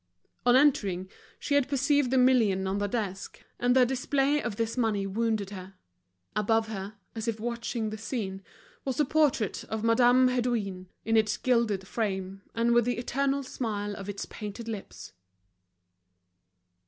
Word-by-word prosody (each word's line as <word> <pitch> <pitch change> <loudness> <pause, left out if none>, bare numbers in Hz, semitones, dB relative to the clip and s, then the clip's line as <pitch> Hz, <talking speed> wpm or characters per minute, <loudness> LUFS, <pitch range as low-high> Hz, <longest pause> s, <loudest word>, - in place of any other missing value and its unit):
On 245 - +7
entering, 195 -10 +2 0.3
she 285 - -3
had 285 -2 +3
perceived 280 0 +2
the 265 - +2
million 230 -7 +4
on 190 +1 -1
the 205 - 0
desk, 200 -4 -4 0.2
and 245 +1 +3
the 255 -1 +6
display 270 +3 +1
of 235 -4 -3
this 225 +1 -2
money 220 -5 0
wounded 215 0 -1
her. 190 -1 -9 0.6
Above 220 +1 +1
her, 200 0 -6 0.2
as 225 0 -5
if 225 -1 -1
watching 230 -1 -3
the 215 - -6
scene, 205 -4 -4 0.4
was 265 -3 -2
the 295 - +3
portrait 280 -8 +1
of 220 0 -4
Madame 245 +2 +5
Hédouin, 225 -7 -1 0.2
in 225 - +2
its 215 -1 +2
gilded 230 -6 +1
frame, 195 -3 -3
and 235 +1 +2
with 240 -1 +4
the 245 - 0
eternal 275 +3 0
smile 210 -5 -3
of 200 0 -7
its 205 - -4
painted 215 +2 -7
lips. 215 - -7
225 Hz, 155 wpm, -28 LUFS, 205-250 Hz, 0.6 s, On